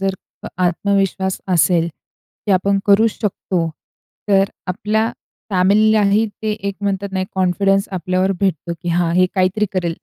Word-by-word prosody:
जर 195 0 0 0.4
आत्मविश्वास 190 +1 0 0.2
असेल, 170 0 +3 0.6
की 205 - +3
आपण 195 +2 +2
करूच 215 +3 +5
शकतो. 195 -4 -1 0.7
तर 195 -1 +3 0.2
आपल्या 210 +4 0 0.5
फॅमिलीलाही 205 +2 +3 0.2
ते 215 - 0
एक 200 -2 -4
म्हणतात 200 0 -2
नाही 190 -1 -1
कॉन्फिडन्स 195 +1 +1
आपल्यावर 185 +1 0
भेटतो, 175 -3 -1
की 175 - -4
"हां, 170 0 +1
हे 185 0 +5
काहीतरी 190 +3 +1
करेल." 175 -3 -1
195 Hz, 130 wpm, -18 LUFS, 185-200 Hz, 0.7 s, करूच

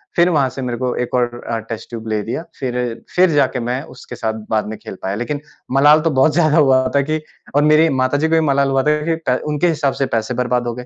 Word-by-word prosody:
फिर 175 +1 +4
वहाँ 145 -6 +2
से 135 - -7
मेरे 125 -2 -3
को 125 0 -2
1 125 - -7
और 120 -1 -1
अ, 115 - -1
टेस्ट 110 0 -8
ट्यूब 115 -1 -7
ले 110 -1 0
दिया 120 +9 -4 0.2
फिर, 125 -3 -3
फिर 185 0 +5
जाके 135 -3 +2
मैं 125 +2 -2
उसके 125 - -10
साथ 110 -2 -2 0.2
बाद 110 -1 +1
में 110 0 -6
खेल - - -9
पाया। 95 +1 -2
लेकिन 130 +7 -3 0.3
मलाल 145 +3 +6
तो 165 - +1
बहुत 140 +3 +3
ज़्यादा 155 -1 +3
हुआ 130 -4 +4
था 140 - +5
कि 155 +2 -2 0.3
और 145 - +4
मेरी 155 +2 +5
माता 130 +2 +1
जी 155 +2 +1
को 165 - +3
भी - - +4
मलाल 140 0 +2
हुआ 135 -1 +1
था 150 +1 +2
कि 165 0 +1
पै 125 - +3 0.2
उनके 150 +4 +1
हिसाब 150 -5 0
से - - +3
पैसे 115 +2 -1
बर्बाद 125 0 0
हो 120 - -2
गए। 125 0 -8
130 Hz, 265 wpm, -18 LUFS, 120-150 Hz, 0.3 s, मलाल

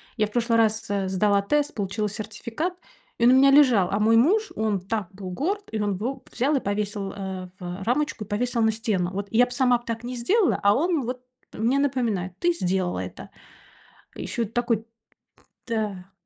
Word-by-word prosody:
Я 215 -3 +1
в 210 - -16
прошлый 235 0 +1
раз, 225 -1 +1
э, 200 -2 -1
сдала 200 +1 +2
тест, 295 +8 0
получила 205 +1 -2
сертификат 225 - -4 0.4
и 235 - +2
он 245 - +7
у - - +6
меня 275 +1 +6
лежал. 250 -10 +5
А 200 - +1
мой 220 +2 +4
муж, 390 - +3
он 215 -3 0
так 195 0 -3
был 190 -1 -8
горд 365 - -2
и 215 - -1
он 205 -2 0
ву 255 +6 -4
взял 275 +5 +1
и 270 - +1
повесил, 200 -1 -2
э, 190 -2 -6
в 180 +1 -6
рамочку, 245 0 0
повесил 235 +4 -1
на 220 0 +4
стену. 210 -5 -1
Вот 200 +1 -4
я 240 +2 +5
б 245 - -12
сама 250 -1 +3
б 240 - -18
так 230 0 -4
не 250 +1 -4
сделала, 370 - +2
а 200 0 +6
он 325 - +1
вот 250 +1 -4 0.3
мне 240 +6 +1
напоминает: 235 -10 0
ты 350 0 +2
сделала 185 - -1
это. - - -7 0.9
Ещё 240 - -4
и - - -1
такой 230 0 -1 0.8
да 205 -5 -3
225 Hz, 195 wpm, -25 LUFS, 200-250 Hz, 0.9 s, он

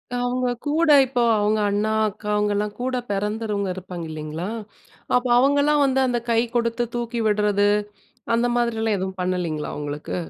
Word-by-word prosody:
அவுங்க 245 +1 0 0.2
கூட 310 +3 +1 0.2
இப்போ 250 -1 -1 0.2
அவுங்க 210 +1 +1
அண்ணா 205 +2 0 0.2
அக்கா 210 +1 -11
அவுங்கலாம் 210 0 0
கூட 255 +1 -1
பிறந்தவங்க 210 0 -2
இருப்பாங்க 180 -2 -7
இல்லேங்களா! 155 +3 -5 0.7
அப்போ 250 +1 +2
அவுங்கலாம் 285 +3 +3
வந்து 265 -1 +1
அந்த 245 -1 0
கை 230 - +4 0.2
கொடுத்து 235 0 +1
தூக்கி 235 0 -2
விட்றது, 205 -1 +2 0.7
அந்த 235 +1 +2
மாதிரி 235 -2 0
எல்லாம் 220 -2 +1
எதுவும் 190 0 -4
பண்ணலேங்களா! 180 -4 -2
அவுங்களுக்கு. 145 0 -5
215 Hz, 145 wpm, -23 LUFS, 195-245 Hz, 0.7 s, கை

